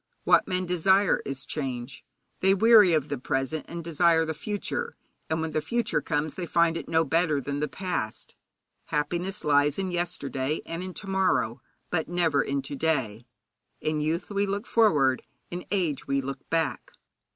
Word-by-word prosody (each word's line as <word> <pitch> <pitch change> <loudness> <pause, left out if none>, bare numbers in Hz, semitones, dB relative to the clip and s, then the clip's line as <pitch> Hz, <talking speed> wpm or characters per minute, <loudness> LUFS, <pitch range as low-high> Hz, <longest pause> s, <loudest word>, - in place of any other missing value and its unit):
What - - +4
men 185 0 -1
desire 190 +3 +3
is 135 -1 -4
change. 130 -3 -4 0.4
They 190 +1 +4
weary 210 -4 +7
of 150 -2 0
the 140 -3 -3
present, 135 +4 -2
and 170 0 -6
desire 165 0 +3
the 160 - -2
future; 210 - -4 0.3
and 160 0 0
when 160 0 -2
the 155 - 0
future 235 -6 0
comes 150 -1 -1
they 180 -2 -5
find 170 -1 +3
it 165 - -5
no 160 0 +3
better 160 -1 +1
than 140 +2 -3
the 150 - 0
past. 180 - -4 0.5
Happiness 175 +6 -2
lies 145 -1 +3
in 190 -1 -2
yesterday 155 -5 -2
and 165 +1 -5
in 185 -1 -6
to 200 - -7
morrow, 190 -12 +1 0.3
but 160 -3 -1
never 165 -5 +2
in 140 -1 -2
to 140 - -6
day. 130 -7 -1 0.5
In 155 -1 -1
youth 165 +6 -2
we 200 0 +1
look 200 +3 -2
forward, 150 - +3 0.3
in 175 +1 -5
age 170 -9 -1
we 140 0 +1
look 135 0 -6
back. 165 -3 -1
160 Hz, 175 wpm, -27 LUFS, 145-180 Hz, 0.5 s, weary